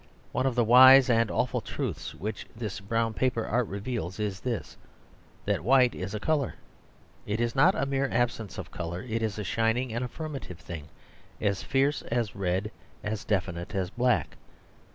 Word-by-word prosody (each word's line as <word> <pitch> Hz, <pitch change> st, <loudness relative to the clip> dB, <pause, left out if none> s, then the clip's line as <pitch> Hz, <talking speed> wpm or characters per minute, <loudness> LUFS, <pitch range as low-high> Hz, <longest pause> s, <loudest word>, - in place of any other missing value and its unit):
One 130 Hz, -, +1 dB
of 130 Hz, -, -1 dB
the 120 Hz, -, +3 dB
wise 130 Hz, +3 st, +8 dB
and 115 Hz, -1 st, +3 dB
awful -, -, 0 dB
truths -, -, -4 dB
which 105 Hz, +3 st, -5 dB
this 110 Hz, -4 st, -4 dB
brown 115 Hz, +3 st, -1 dB
paper 115 Hz, -1 st, 0 dB
art 120 Hz, 0 st, 0 dB
reveals, 100 Hz, -2 st, -4 dB
is 100 Hz, -2 st, -2 dB
this, 120 Hz, -4 st, -4 dB, 0.7 s
that -, -, 0 dB
white 125 Hz, +2 st, +5 dB
is 95 Hz, +3 st, -5 dB
a -, -, -2 dB
colour. 145 Hz, +2 st, 0 dB, 0.7 s
It 105 Hz, +2 st, -1 dB
is 120 Hz, 0 st, 0 dB
not 165 Hz, +8 st, +5 dB
a 135 Hz, -, 0 dB
mere 135 Hz, 0 st, 0 dB
absence 115 Hz, -3 st, -1 dB
of 90 Hz, -3 st, -7 dB
colour; 85 Hz, +1 st, -5 dB
it 115 Hz, -2 st, -2 dB
is 110 Hz, -2 st, -2 dB
a 105 Hz, -, -3 dB
shining 115 Hz, +4 st, 0 dB
and 120 Hz, +2 st, -1 dB
affirmative 135 Hz, -, -6 dB
thing, 80 Hz, -3 st, -8 dB, 0.5 s
as 100 Hz, -2 st, 0 dB
fierce 140 Hz, +2 st, +1 dB
as 115 Hz, -3 st, -2 dB
red, 95 Hz, +2 st, -1 dB, 0.3 s
as 105 Hz, 0 st, -3 dB
definite 90 Hz, -4 st, -2 dB
as 95 Hz, -1 st, -1 dB
black. 125 Hz, +1 st, +1 dB
115 Hz, 175 wpm, -28 LUFS, 100-125 Hz, 0.7 s, wise